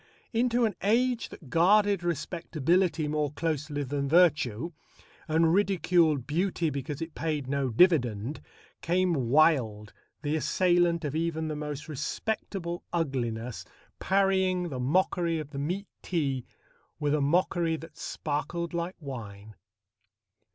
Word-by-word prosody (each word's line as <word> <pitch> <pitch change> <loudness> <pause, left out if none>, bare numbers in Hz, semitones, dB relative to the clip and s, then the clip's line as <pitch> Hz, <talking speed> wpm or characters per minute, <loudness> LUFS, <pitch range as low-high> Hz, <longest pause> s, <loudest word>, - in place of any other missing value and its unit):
Into 240 +1 +2
an 215 - 0
age 240 +4 +1
that 140 -7 -13
guarded 200 +3 +4
respectability 170 0 0
more 150 -1 -1
closely 150 -2 -2
than 140 +1 -2
virtue 155 -4 +3 0.6
and 160 +1 +3
ridiculed 175 -7 +2
beauty 165 +2 0
because 140 +2 -4
it 165 -1 -8
paid 155 -4 -2
no 140 -1 0
dividend 125 - +2 0.4
came 180 +1 +1
Wilde, 125 -6 +2 0.3
the 150 +1 0
assailant 175 0 +2
of 145 0 -3
even 160 -1 -1
the 155 - -3
most 150 -1 -5
respectable 170 +3 -3
ugliness, 125 -8 -2 0.4
parrying 190 -2 +2
the 130 -4 -5
mockery 170 +4 +1
of 150 -2 -6
the 140 - -5
meat 180 +8 -2 0.2
tea 140 -8 -2 0.5
with 145 -1 +1
a 150 - +2
mockery 170 +2 +2
that 160 -1 -10
sparkled 170 +2 -3
like 170 +2 -3
wine. 110 -8 -8
160 Hz, 125 wpm, -28 LUFS, 140-175 Hz, 0.6 s, guarded